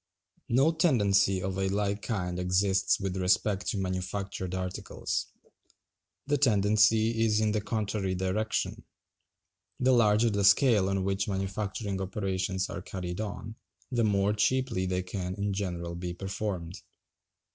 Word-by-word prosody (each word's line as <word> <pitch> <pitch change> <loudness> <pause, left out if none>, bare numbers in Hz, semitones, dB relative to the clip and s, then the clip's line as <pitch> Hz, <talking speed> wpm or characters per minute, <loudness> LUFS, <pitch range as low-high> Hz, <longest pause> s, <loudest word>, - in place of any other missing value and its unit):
No 135 +7 +4
tendency 100 - +2
of 95 0 -3
a 95 - +1
like 100 +1 -1
kind 90 -5 -3
exists 95 +1 +2
with 95 -2 -3
respect 95 +2 +1
to - - 0
manufactured 95 0 -3
articles. 90 0 -3 1.0
The 145 0 +1
tendency 110 -1 +3
is 110 -1 +2
in 110 -1 +2
the 105 0 0
contrary 100 -3 -2
direction. 95 +4 -1 1.0
The 130 +1 +3
larger 115 -1 +4
the 100 0 0
scale 105 -1 +5
on 95 -1 0
which 95 0 -1
manufacturing 95 0 -3
operations 95 -1 -2
are 85 - -6
carried 90 +1 -5
on, 110 +1 -6 0.3
the 120 -2 +1
more 100 -1 +2
cheaply 110 -2 +1
they 90 0 -1
can 90 0 -4
in 100 0 -2
general 85 -3 -3
be 85 0 -4
performed. 95 -2 -4
100 Hz, 135 wpm, -29 LUFS, 95-110 Hz, 1.0 s, scale